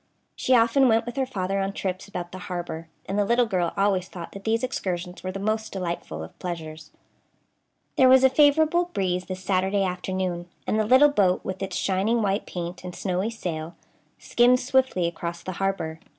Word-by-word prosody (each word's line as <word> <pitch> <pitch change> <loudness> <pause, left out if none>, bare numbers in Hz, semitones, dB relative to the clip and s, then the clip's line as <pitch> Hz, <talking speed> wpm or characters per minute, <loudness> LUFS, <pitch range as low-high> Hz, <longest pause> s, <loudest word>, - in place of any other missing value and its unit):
She 255 - +2
often 240 +3 +4
went 225 0 +3
with 240 - -6
her 265 -1 0
father 195 -5 -2
on 195 0 -1
trips 190 -1 -4
about 175 -3 -6
the 185 - -8
harbor, 170 -2 -5 0.2
and 200 +2 -2
the - - +4
little 235 +4 +3
girl 180 -6 0
always 195 -2 +1
thought 175 -3 -8
that 195 0 -10
these 225 +1 +1
excursions 180 -7 -3
were 185 - -4
the 190 - -5
most 215 +2 -1
delightful 180 -3 -4
of - - -12
pleasures. 160 -3 -6 1.1
There 260 -1 +6
was 260 0 +7
a 265 - +7
favorable 315 +5 +4
breeze 180 -1 -1
this 185 0 -6
Saturday 190 +1 +1
afternoon, 180 -1 -3 0.2
and 215 - 0
the 215 - +2
little 260 +5 +7
boat, 190 -8 +2
with 190 0 -4
its 195 - -3
shining 205 +4 +1
white 200 +1 0
paint 175 0 -6
and 180 -1 -7
snowy 185 +2 -1
sail, 170 -7 -5 0.4
skimmed 245 +1 +3
swiftly 260 -8 +1
across 170 0 -4
the 185 - -4
harbor. 160 -5 -2
195 Hz, 190 wpm, -25 LUFS, 180-230 Hz, 1.1 s, was